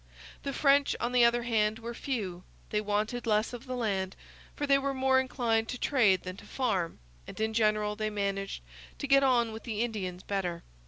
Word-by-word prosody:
The 275 - -3
French, 280 0 +3
on 240 - -1
the 250 -1 +5
other 235 0 +4
hand, 220 -2 +1
were 230 +1 -6
few, 210 -10 -3 0.3
they 210 - +1
wanted 215 +4 -1
less 215 +2 +2
of 245 +2 -8
the 255 - -3
land, 195 -6 -1 0.4
for 290 - -2
they 275 -1 +4
were 275 0 -2
more 265 0 +4
inclined 235 -4 0
to 250 - -3
trade 220 -10 +3
than 185 0 -6
to - - -12
farm, 200 -10 -1 0.3
and - - -9
in 220 0 0
general 215 -1 +2
they 215 0 -1
managed 195 - -3 0.3
to - - -4
get 275 0 +5
on 245 -4 +3
with 220 +1 -7
the 220 -2 -3
Indians 185 -6 -4
better. 180 -4 -2
225 Hz, 200 wpm, -30 LUFS, 205-250 Hz, 0.4 s, the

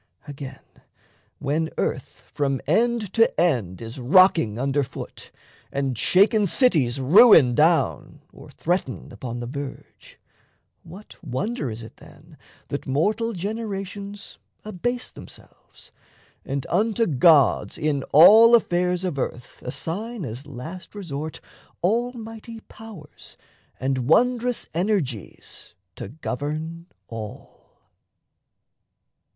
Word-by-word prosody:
Again, 140 -2 -8 0.8
when 155 +3 -1
earth - - -3
From 140 -2 -1
end 220 - +1
to 225 -7 +2
end 120 - 0
is 115 +4 -8
rocking 155 - +4
under 135 +3 0
foot, 135 -1 -8 0.4
And 135 -2 -2
shaken 200 - +3
cities 155 - +2
ruin 145 - +7
down, 160 +6 +1
or - - -14
threaten 175 -6 -3
Upon 120 -2 -6
the - - -4
verge, 140 +2 -9 0.6
what 185 +6 -14
wonder 205 - -3
is 110 +1 -7
it 110 - -13
then - - -17 0.3
That - - -5
mortal 210 - 0
generations 200 0 -6 0.3
abase 245 +5 -3
themselves, - - -15 0.5
And 135 -1 -4
unto 220 +5 +1
gods 140 - +3
in 150 -2 -1
all 220 +9 +8
affairs 180 -4 +1
of 175 -7 -3
earth 120 -1 -5
Assign 195 - -5
as 125 +4 -7
last 155 +10 -9
resort 155 -6 -6 0.4
almighty 225 +1 -3
powers 210 -11 -14 0.4
And 130 -1 -1
wondrous 245 +5 +2
energies 160 - -3 0.2
to - - -7
govern 155 +5 -5 0.2
all? 110 -2 -11
165 Hz, 105 wpm, -23 LUFS, 135-210 Hz, 0.8 s, all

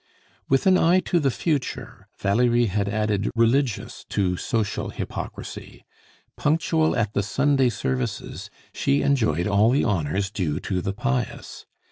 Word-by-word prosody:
With 135 0 +2
an 185 -1 +5
eye 175 +3 +4
to 175 0 +1
the 140 -4 +2
future, 145 0 -3
Valerie 120 +4 +2
had 100 -1 -1
added 105 -1 0
religious 115 +1 +1
to 90 -3 0
social 110 +2 -2
hypocrisy. - - -7 0.5
Punctual 160 +1 +1
at 110 -3 0
the - - +1
Sunday 135 +5 +2
services, 65 - -3 0.2
she 140 +1 +1
enjoyed 100 - +1
all 105 +2 +3
the 135 +4 +2
honors 95 -1 -1
due 80 -7 -2
to 90 -3 -2
the 95 - -2
pious. 125 +2 -3
115 Hz, 135 wpm, -24 LUFS, 100-135 Hz, 0.5 s, an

